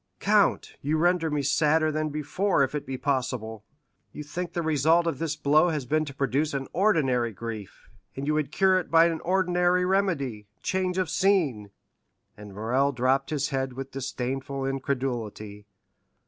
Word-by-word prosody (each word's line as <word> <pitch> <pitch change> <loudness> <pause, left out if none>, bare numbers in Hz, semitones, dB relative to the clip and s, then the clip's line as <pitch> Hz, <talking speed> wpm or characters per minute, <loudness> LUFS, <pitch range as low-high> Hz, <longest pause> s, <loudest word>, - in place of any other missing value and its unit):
"Count, - - +2
you 150 +3 0
render 175 0 +2
me 150 -1 -1
sadder 155 +2 +2
than 155 0 -1
before, 150 +3 0
if 135 - -2
it 150 -3 -4
be 130 -1 -4
possible. 125 -6 -2 0.5
You 150 - -7
think 170 +4 -5
the 170 - -2
result 160 +2 +3
of 165 -5 -2
this 160 -2 -2
blow 155 +4 +3
has 150 -5 -2
been 155 +4 +1
to 140 - -8
produce 140 +3 0
an 135 -1 -3
ordinary 135 - +2
grief, 110 -1 -8 0.3
and 135 - -4
you 150 - +1
would 150 -2 -1
cure 190 +2 +3
it - - -7
by 165 0 +6
an 165 -1 0
ordinary 180 0 +1
remedy—change 180 - -1
of 185 -2 +1
scene." 155 - +1 0.7
And 105 -2 -11
Morrel 125 +7 +1
dropped 130 +1 +1
his 145 -2 -1
head 135 -2 -2
with 135 +1 -7
disdainful 135 +1 -4
incredulity. 120 -6 -4
145 Hz, 160 wpm, -26 LUFS, 130-165 Hz, 0.7 s, by